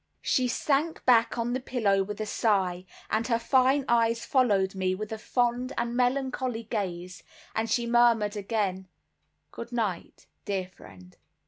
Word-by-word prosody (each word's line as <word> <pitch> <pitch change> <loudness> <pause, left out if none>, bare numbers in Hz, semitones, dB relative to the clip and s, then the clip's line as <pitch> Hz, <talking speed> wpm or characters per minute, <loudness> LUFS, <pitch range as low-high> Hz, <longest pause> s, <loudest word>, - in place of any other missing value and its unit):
She 255 -1 +2
sank 290 +6 -1
back 235 -1 +4
on 235 +1 -1
the 255 - -1
pillow 220 -7 +1
with 205 +2 -5
a 215 - -2
sigh, 190 -5 0 0.3
and 220 +1 0
her 230 -2 +2
fine 260 +3 +2
eyes 230 -1 +2
followed 205 -8 +2
me 185 -1 -1
with 215 +2 -6
a 220 - -4
fond 245 +3 0
and 235 0 -1
melancholy 255 -2 0
gaze, 185 -5 -4 0.3
and 220 +1 -1
she 235 +2 +1
murmured 235 -3 +3
again 200 -3 -2 0.6
"Good 235 +1 -8
night, 215 -7 -3 0.2
dear 190 -2 -2
friend." 90 - -16
230 Hz, 150 wpm, -27 LUFS, 195-245 Hz, 0.6 s, back